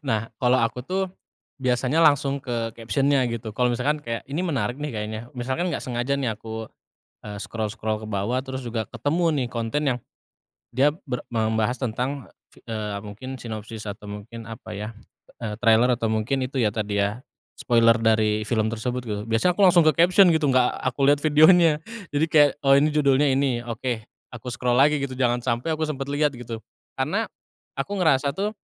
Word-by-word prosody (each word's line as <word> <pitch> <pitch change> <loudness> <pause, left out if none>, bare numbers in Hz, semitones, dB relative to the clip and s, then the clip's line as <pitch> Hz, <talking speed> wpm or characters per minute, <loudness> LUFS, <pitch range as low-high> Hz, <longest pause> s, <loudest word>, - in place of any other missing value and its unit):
Nah, 110 +1 -1
kalau 125 0 +3
aku 115 +2 -1
tuh 190 +5 -1 0.6
biasanya 130 +3 +1
langsung 140 -2 +3
ke 120 -4 -3
caption-nya 135 +3 +1
gitu. 115 -1 -5
Kalau 125 0 +2
misalkan 140 +6 0
kayak, 115 0 -4
“Ini 150 +5 -2
menarik 125 - -1
nih 150 0 -3
kayaknya,” 110 0 -4
misalkan 130 +9 -2
nggak - - -3
sengaja 125 +2 -1
nih 130 -5 -1
aku, 110 +1 -7 0.5
eee, 105 -1 -7
scroll-scroll 110 0 -3
ke - - -6
bawah, 105 +5 -1
terus 130 -1 -5
juga 115 -2 -2
ketemu 145 +9 0 0.2
nih 120 - -5
konten 115 +5 -2
yang - - -9 0.7
dia 130 +4 +4 0.2
ber 125 -1 -2
membahas 110 +2 +1
tentang 130 +3 -3 0.2
fi - - -19
eee, 105 -3 -4
mungkin 130 +6 -7
sinopsis 110 -1 -7
atau 100 0 -8
mungkin 110 +2 -8
apa 115 +2 -9
ya, 105 +1 -5 0.5
eee, 110 -3 -3
trailer, 120 +2 +4
atau 115 -2 -1
mungkin 115 +5 0
itu 135 - -9
ya 105 -3 +2
tadi 105 -1 -2
ya 105 +4 -1 0.4
spoiler 115 -1 +4
dari 110 -1 +2
film 110 -1 +1
tersebut 125 +2 -3
gitu. 105 -2 -3
Biasanya 115 +11 +2
aku - - +3
langsung 175 -2 +6
ke 155 - +5
caption 180 +4 +5
gitu, 155 -3 +2
enggak 130 -1 +3
aku 130 +1 -1
lihat 145 0 +3
videonya. 155 +1 +5 0.3
Jadi 155 +3 +2
kayak, 145 -2 +6
“Oh, 135 - +5
ini 150 +2 +3
judulnya 140 -1 +3
ini, 135 -2 +1
oke,” 120 -1 -3 0.3
aku 120 +1 -8
scroll 125 0 0
lagi 145 +2 +4
gitu, 140 -1 -3
jangan 125 -1 +1
sampai 120 +6 0
aku 160 - -1
sempet 140 -2 -4
lihat 145 0 +1
gitu. 115 -2 -7 0.4
Karena - - 0 0.5
aku 135 +9 -3
ngerasa 140 -4 +3
tuh, 205 +2 -1
125 Hz, 180 wpm, -24 LUFS, 110-140 Hz, 0.7 s, langsung